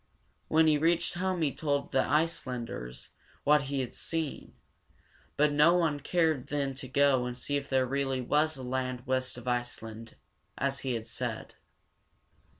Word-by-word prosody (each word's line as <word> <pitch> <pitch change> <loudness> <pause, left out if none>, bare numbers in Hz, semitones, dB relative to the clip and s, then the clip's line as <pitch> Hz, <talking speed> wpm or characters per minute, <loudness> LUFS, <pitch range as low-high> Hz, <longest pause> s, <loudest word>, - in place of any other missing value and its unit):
When 160 +1 +4
he 155 -2 +4
reached 170 +2 +2
home 185 -1 -1
he 145 - +1
told 145 -2 -1
the 135 - +2
Ice´land 130 -6 0
ers 60 +1 -7 0.3
what 150 -1 +4
he 140 -1 0
had 125 - -5
seen; 160 -3 -4 0.8
but 150 0 +4
no 150 +4 +6
one 160 -5 +1
cared 160 -3 +1
then 140 -2 -1
to 135 0 -7
go 135 -1 +3
and 125 0 -5
see 145 +3 -2
if 140 -1 -2
there 130 -1 +3
really 135 0 -1
was 150 +4 +1
a 130 - -7
land 130 -1 -3
west 130 -1 -1
of 125 +1 -10
Iceland, 115 -2 -4 0.4
as 135 0 0
he 130 -2 -2
had 110 -1 -4
said. - - -4
140 Hz, 165 wpm, -30 LUFS, 125-150 Hz, 0.8 s, no